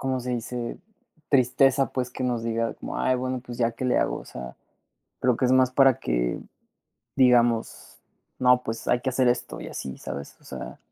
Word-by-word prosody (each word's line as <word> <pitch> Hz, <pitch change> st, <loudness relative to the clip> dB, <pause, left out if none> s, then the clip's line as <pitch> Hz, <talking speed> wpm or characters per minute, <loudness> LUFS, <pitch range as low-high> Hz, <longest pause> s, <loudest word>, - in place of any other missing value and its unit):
¿cómo 130 Hz, -1 st, -1 dB
se 125 Hz, +1 st, -4 dB
dice? 120 Hz, 0 st, -4 dB, 0.5 s
Tristeza, 135 Hz, 0 st, +3 dB
pues, 125 Hz, -1 st, -2 dB
que 130 Hz, -, -6 dB
nos 120 Hz, -2 st, -1 dB
diga 115 Hz, 0 st, -1 dB
como: -, -, -6 dB
"Ay, 130 Hz, 0 st, +2 dB
bueno, 130 Hz, 0 st, -2 dB
pues, 120 Hz, 0 st, -8 dB
ya, 115 Hz, -1 st, +1 dB
¿qué 130 Hz, -, -6 dB
le 125 Hz, -, +2 dB
hago?" -, -, 0 dB
O -, -, -11 dB
sea, 65 Hz, 0 st, -9 dB, 0.6 s
creo 125 Hz, -2 st, +2 dB
que 130 Hz, -, +1 dB
es 125 Hz, -, +2 dB
más 130 Hz, -1 st, +4 dB
para 135 Hz, -2 st, +5 dB
que -, -, -1 dB, 0.8 s
digamos: 120 Hz, -3 st, +2 dB, 0.4 s
"No, 125 Hz, 0 st, +4 dB
pues, 115 Hz, 0 st, -5 dB
hay 120 Hz, -, +3 dB
que 130 Hz, -, -1 dB
hacer 130 Hz, 0 st, +2 dB
esto, 120 Hz, 0 st, -1 dB
y -, -, -7 dB
así", 65 Hz, -1 st, -6 dB
¿sabes? 70 Hz, 0 st, -7 dB
O -, -, -24 dB
sea -, -, -8 dB
125 Hz, 200 wpm, -25 LUFS, 115-130 Hz, 0.8 s, para